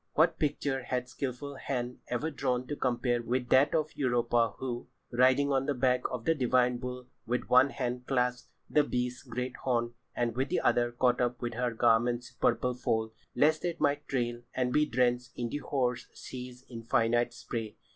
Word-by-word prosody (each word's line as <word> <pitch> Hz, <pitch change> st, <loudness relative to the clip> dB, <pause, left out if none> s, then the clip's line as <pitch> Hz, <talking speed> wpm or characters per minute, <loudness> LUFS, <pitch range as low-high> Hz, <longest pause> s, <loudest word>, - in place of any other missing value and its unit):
What 165 Hz, +2 st, +3 dB
picture 140 Hz, -3 st, 0 dB
had 125 Hz, 0 st, -2 dB
skilful 135 Hz, +2 st, -5 dB
hand 125 Hz, -2 st, -3 dB
ever 150 Hz, +6 st, -2 dB
drawn 125 Hz, -3 st, -1 dB
to 145 Hz, -, -4 dB
compare 120 Hz, -2 st, 0 dB
with 125 Hz, +1 st, -2 dB
that 135 Hz, +4 st, +5 dB
of 155 Hz, -1 st, 0 dB
Europa 120 Hz, -3 st, +2 dB
who, 120 Hz, -2 st, -4 dB, 0.2 s
"riding 130 Hz, +3 st, +4 dB
on 135 Hz, 0 st, +1 dB
the 145 Hz, -, +1 dB
back 125 Hz, 0 st, +2 dB
of 125 Hz, -2 st, -5 dB
the 165 Hz, -, +4 dB
divine 125 Hz, -3 st, +2 dB
bull, 125 Hz, 0 st, -6 dB, 0.2 s
with 125 Hz, +2 st, -1 dB
one 130 Hz, +2 st, +7 dB
hand 125 Hz, -2 st, -3 dB
clasped 125 Hz, -2 st, 0 dB, 0.2 s
the 150 Hz, -, +4 dB
beast's 125 Hz, -2 st, -2 dB
great 125 Hz, +1 st, -4 dB
horn, 120 Hz, -2 st, 0 dB, 0.2 s
and 120 Hz, -2 st, 0 dB
with 130 Hz, +2 st, 0 dB
the -, -, +1 dB
other 120 Hz, 0 st, +2 dB
caught 125 Hz, +1 st, +2 dB
up 120 Hz, 0 st, 0 dB
her 125 Hz, +1 st, -1 dB
garment's 120 Hz, +1 st, +2 dB
purple 125 Hz, 0 st, +1 dB
fold, 110 Hz, -2 st, -1 dB, 0.2 s
lest 155 Hz, +5 st, +3 dB
it 175 Hz, -2 st, -2 dB
might 145 Hz, 0 st, +1 dB
trail 120 Hz, -2 st, -1 dB
and 125 Hz, -1 st, 0 dB
be 150 Hz, 0 st, +3 dB
drenched 125 Hz, -1 st, +1 dB
in 120 Hz, -1 st, -3 dB
the 145 Hz, -, -3 dB
hoar 125 Hz, -4 st, 0 dB
sea's 125 Hz, 0 st, -10 dB
infinite 115 Hz, 0 st, +1 dB
spray. 115 Hz, -3 st, -5 dB
125 Hz, 175 wpm, -30 LUFS, 120-130 Hz, 0.2 s, one